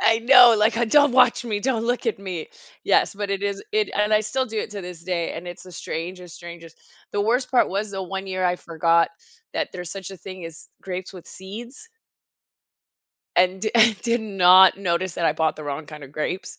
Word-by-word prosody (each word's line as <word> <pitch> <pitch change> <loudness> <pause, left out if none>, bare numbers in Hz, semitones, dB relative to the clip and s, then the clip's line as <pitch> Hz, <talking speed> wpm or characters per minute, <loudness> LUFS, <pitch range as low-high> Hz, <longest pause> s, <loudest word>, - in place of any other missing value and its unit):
I 225 0 +3
know, 245 -1 +8
like, 215 +2 +2
uh, 240 - +2
"Don't 285 +4 +4
watch 250 -1 +4
me, 215 -3 -2
don't 230 0 -1
look 245 +1 -1
at 225 - -1
me." 185 -5 -6 0.4
Yes, - - +2
but 205 0 -4
it 200 0 -2
is 200 -1 -3
it 430 0 +1
and 210 +1 +1
I 215 - +4
still 260 +5 -2
do 220 -1 -5
it - - -4
to 205 - -6
this 175 -2 -9
day, 170 -2 -2
and 175 +2 -7
it's 175 0 -10
the 185 - -13
strangest, 175 +1 -7
strangest 170 -1 -11 0.4
The 205 - -1
worst 245 +5 0
part 250 - +3
was 200 +2 -3
the 195 -1 -5
one 195 +1 -6
year 185 0 -2
I 180 0 +2
forgot 165 0 +1 0.5
that - - -2
there's 180 -2 -7
such 195 0 -8
a - - -9
thing 185 0 -9
as 165 -1 -11
grapes 185 -1 -6
with 180 - -12
seeds 235 - -11 1.5
and 185 +1 +2
di 215 - 0
and 225 -2 +4
did 235 0 0
not 190 -3 +6
notice 185 -2 -2
that 170 - -2
I 155 - +3
bought 160 0 -1
the 155 - -9
wrong 145 +1 -5
kind 150 -1 -10
of 135 - -15
grapes. 155 +5 -5
190 Hz, 220 wpm, -23 LUFS, 175-220 Hz, 1.5 s, know